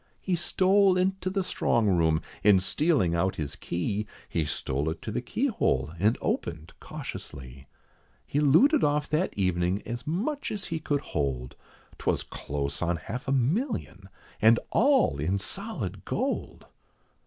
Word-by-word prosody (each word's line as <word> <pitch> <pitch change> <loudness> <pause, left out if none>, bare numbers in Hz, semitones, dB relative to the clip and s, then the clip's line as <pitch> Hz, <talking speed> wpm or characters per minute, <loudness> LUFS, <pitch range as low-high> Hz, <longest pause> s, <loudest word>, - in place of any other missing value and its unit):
He 185 - 0
stole 190 +2 +3
into 185 0 0
the 195 0 0
strong 115 -10 +1
room, 80 -4 +2 0.2
and 100 -2 +6
stealing 135 - +2
out 95 +3 +1
his 75 -2 -4
key, 100 +5 -2 0.2
He 80 - -1
stole 70 0 -1
it 80 - -4
to - - -4
the - - -2
keyhole, 70 +3 0
and 105 +5 +3
opened 80 -1 -3
cautiously. 65 0 -8 0.6
He 145 - -1
looted 205 - +5
off 150 0 +2
that 160 +5 +1
evening 90 0 +1
as 120 +3 -5
much 240 - -2
as 210 -2 -4
he 165 - -3
could 145 -2 -1
hold, 65 - -3 0.4
'Twas - - 0
close 70 0 -4
on 90 0 +1
half 110 - -6
a - - 0
million, 140 - -1 0.3
and 115 +2 +6
all 265 - +3
in 90 +7 0
solid 165 - -5
gold. - - -3
105 Hz, 145 wpm, -28 LUFS, -, 0.6 s, and